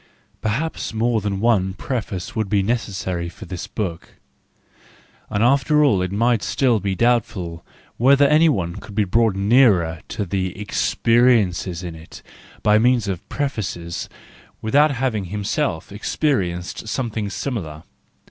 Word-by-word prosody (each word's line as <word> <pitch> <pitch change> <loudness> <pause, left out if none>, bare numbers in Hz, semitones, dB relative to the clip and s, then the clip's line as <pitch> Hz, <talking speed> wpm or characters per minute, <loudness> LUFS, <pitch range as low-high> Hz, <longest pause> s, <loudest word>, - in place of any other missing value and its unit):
PERHAPS 115 +3 -2
more 115 0 +1
than 100 -1 -2
one 100 -4 +2
preface 110 -3 -4
would 110 -3 -1
be 100 -2 +2
necessary 95 -6 -2
for - - -11
this 90 0 -6
book; 90 -7 -5 1.1
and 100 - 0
after 140 +4 +4
all 105 -11 +3
it 90 0 -2
might 115 +2 +2
still 125 -5 +1
be 100 -1 -2
doubtful 105 -8 0 0.3
whether 140 +3 +5
any 155 +3 +5
one 90 - -1
could 100 - -10
be 105 - +3
brought 110 +1 +2
nearer 100 -7 +3
to 105 - -3
the 95 0 -3
experiences 105 -5 +2
in 85 -2 -5
it 80 +1 -12 0.4
by 105 0 +5
means 120 -2 +3
of 95 -3 -5
prefaces, 95 - -3 0.5
without 145 +8 +3
having 125 -7 -1
himself 105 - -2
experienced 100 - -2
something 110 -3 -2
similar. 90 - -5
105 Hz, 135 wpm, -21 LUFS, 95-120 Hz, 1.1 s, whether